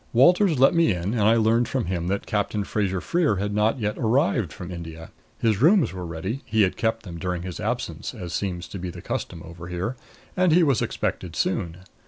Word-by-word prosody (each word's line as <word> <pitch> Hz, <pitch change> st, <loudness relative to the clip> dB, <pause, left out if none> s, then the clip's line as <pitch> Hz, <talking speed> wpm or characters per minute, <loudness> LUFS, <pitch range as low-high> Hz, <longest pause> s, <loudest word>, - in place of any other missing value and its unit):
Walters 175 Hz, -, +5 dB
let 135 Hz, +2 st, +5 dB
me 170 Hz, -1 st, +4 dB
in, 90 Hz, +3 st, -2 dB
and 115 Hz, -, 0 dB
I 110 Hz, +3 st, +5 dB
learned 115 Hz, +1 st, +3 dB
from 130 Hz, -4 st, -1 dB
him 85 Hz, -1 st, -2 dB
that 100 Hz, +2 st, -1 dB
Captain 105 Hz, 0 st, -1 dB
Fraser 100 Hz, -3 st, -1 dB
Freer 170 Hz, -10 st, +1 dB
had 100 Hz, +2 st, -2 dB
not 105 Hz, +3 st, +2 dB
yet 105 Hz, -2 st, -2 dB
arrived 120 Hz, -, +2 dB
from 90 Hz, 0 st, -8 dB
India. 80 Hz, -2 st, -8 dB, 0.3 s
His 110 Hz, -2 st, +1 dB
rooms 175 Hz, -, +5 dB
were 90 Hz, -2 st, -5 dB
ready 95 Hz, -, -4 dB
he 110 Hz, -1 st, +2 dB
had 95 Hz, -, +1 dB
kept 115 Hz, 0 st, -1 dB
them 85 Hz, -5 st, -8 dB
during 90 Hz, 0 st, -2 dB
his 90 Hz, -2 st, -6 dB
absence, 120 Hz, +3 st, -3 dB
as 90 Hz, -6 st, -6 dB
seems 90 Hz, -1 st, -3 dB
to 100 Hz, -, -6 dB
be 90 Hz, 0 st, -4 dB
the -, -, -9 dB
custom 85 Hz, -2 st, -4 dB
over 85 Hz, +1 st, -9 dB
here 90 Hz, +7 st, -3 dB, 0.4 s
and 185 Hz, -2 st, +3 dB
he 175 Hz, +1 st, +6 dB
was 140 Hz, -6 st, +2 dB
expected -, -, -2 dB
soon. 85 Hz, +1 st, -1 dB
105 Hz, 215 wpm, -24 LUFS, 90-120 Hz, 0.4 s, he